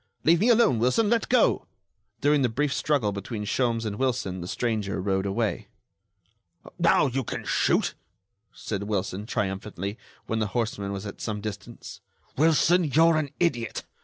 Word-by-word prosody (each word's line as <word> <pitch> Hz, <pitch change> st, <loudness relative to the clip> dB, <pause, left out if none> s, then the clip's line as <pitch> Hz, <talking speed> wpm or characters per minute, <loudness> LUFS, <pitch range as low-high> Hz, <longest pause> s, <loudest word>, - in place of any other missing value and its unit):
"Leave 165 Hz, +1 st, +4 dB
me 220 Hz, +6 st, +3 dB
alone, 230 Hz, -, +4 dB
Wilson! 205 Hz, -, +2 dB
Let 230 Hz, -2 st, +1 dB
go!" 250 Hz, -, +3 dB, 0.5 s
During 145 Hz, 0 st, +3 dB
the 125 Hz, -, +2 dB
brief 140 Hz, +5 st, 0 dB
struggle 140 Hz, -10 st, +1 dB
between 105 Hz, +2 st, -5 dB
Sholmes 115 Hz, 0 st, 0 dB
and 105 Hz, -1 st, -3 dB
Wilson 115 Hz, -8 st, -1 dB
the 85 Hz, -, -6 dB
stranger 105 Hz, -2 st, -2 dB
rode 95 Hz, 0 st, 0 dB
away. 100 Hz, -2 st, -2 dB, 1.1 s
"Now, 170 Hz, -3 st, +4 dB
you 135 Hz, 0 st, -1 dB
can -, -, -5 dB
shoot," -, -, +1 dB, 0.6 s
said 100 Hz, -3 st, -5 dB
Wilson, 100 Hz, 0 st, -3 dB
triumphantly, 100 Hz, 0 st, -3 dB, 0.3 s
when 110 Hz, -, -2 dB
the 110 Hz, -, 0 dB
horseman 105 Hz, -4 st, -2 dB
was 100 Hz, +1 st, -5 dB
at 100 Hz, -, -8 dB
some 105 Hz, -2 st, -3 dB
distance. 105 Hz, +2 st, -8 dB, 0.3 s
"Wilson, 165 Hz, +4 st, +4 dB
you're 160 Hz, +3 st, +4 dB
an 150 Hz, -2 st, -1 dB
idiot! 120 Hz, -10 st, -1 dB
115 Hz, 155 wpm, -26 LUFS, 100-145 Hz, 1.1 s, Leave